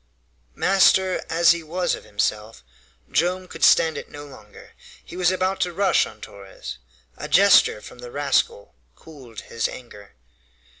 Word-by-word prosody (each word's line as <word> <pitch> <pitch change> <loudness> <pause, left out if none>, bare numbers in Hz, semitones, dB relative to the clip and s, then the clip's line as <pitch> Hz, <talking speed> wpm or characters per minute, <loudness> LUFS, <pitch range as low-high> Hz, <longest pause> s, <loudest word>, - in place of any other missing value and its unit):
Master 190 -1 +2
as 170 +1 +4
he 170 0 -1
was 175 +3 -2
of - - -7
himself, 105 - -3 0.5
Joam 180 +2 0
could - - -8
stand 160 -1 +4
it - - -12
no 145 0 -10
longer. 110 -7 -15 0.3
He - - -11
was 180 -1 +2
about 185 +1 -1
to 175 -1 -1
rush 190 0 +2
on 105 0 -15
Torres. 100 -8 -10 0.4
A - - -7
gesture 105 - +4
from 120 - -13
the 125 0 -9
rascal 140 -6 -1 0.2
cooled 130 -8 -13
his 115 - -3
anger. 105 - -13
145 Hz, 150 wpm, -22 LUFS, 110-180 Hz, 0.5 s, as